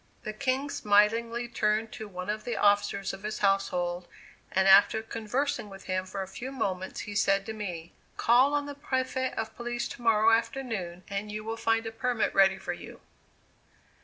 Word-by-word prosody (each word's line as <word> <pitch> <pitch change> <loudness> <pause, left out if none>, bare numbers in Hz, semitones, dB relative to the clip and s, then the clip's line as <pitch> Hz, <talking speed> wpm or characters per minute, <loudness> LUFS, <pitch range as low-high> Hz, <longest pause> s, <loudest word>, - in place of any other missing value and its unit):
The 215 - -4
King 270 +4 -1
smilingly 230 +3 +2
turned 215 -1 0
to 220 - -7
one 185 -2 -7
of 215 0 -5
the 240 - -3
officers 205 -1 +2
of 195 - -8
his 215 +1 -4
household 180 -3 0 0.4
and 190 0 +2
after 200 +3 +6
conversing 225 +2 -2
with 195 -1 -11
him 185 0 -2
for 195 +1 -4
a - - -8
few 245 +7 -7
moments 190 -8 -3
he 210 - -7
said 195 -1 +2
to 220 - -5
me: 175 -6 -6 0.2
"Call 255 +5 +4
on 290 0 0
the 285 - -6
Prefect 260 -2 -2
of 220 0 -3
Police 240 0 -3
to - - -9
morrow 225 -1 +4
afternoon 225 -7 -1
and 200 +1 -4
you 215 0 -5
will 225 +1 -3
find 225 0 +1
a 225 - -4
permit 240 0 0
ready 195 -1 +5
for - - -4
you." - - -10
215 Hz, 185 wpm, -29 LUFS, 195-235 Hz, 0.4 s, after